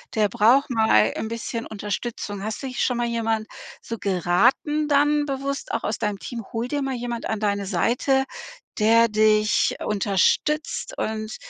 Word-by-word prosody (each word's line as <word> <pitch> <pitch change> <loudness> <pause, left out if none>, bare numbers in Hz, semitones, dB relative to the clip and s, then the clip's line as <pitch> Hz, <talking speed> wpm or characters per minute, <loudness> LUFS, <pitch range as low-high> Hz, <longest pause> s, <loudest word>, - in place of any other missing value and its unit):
der 215 -2 +2
braucht 240 +9 +4
mal 220 - +3
'n - - -3
bisschen 230 +1 -4
Unterstützung.“ 205 -1 -5
Hast 220 +5 -4
dich 260 -1 -2
schon 250 - 0
mal 240 0 0
jemand 225 -2 -1 0.3
so 230 - -6
geraten 200 - +1
dann 295 0 +3
bewusst 275 0 -4
auch 230 - -2
aus 215 - -1
deinem 210 -2 -2
Team: 235 +1 -6
„Hol 230 +1 -2
dir 285 +2 -2
mal 270 -1 -2
jemand 240 -1 -4
an 220 - -1
deine 200 -1 -1
Seite, 245 +8 +1 0.6
der 230 +2 +5
dich 215 0 +3
unterstützt 215 - 0
und 215 0 -3
225 Hz, 155 wpm, -23 LUFS, 210-265 Hz, 0.6 s, der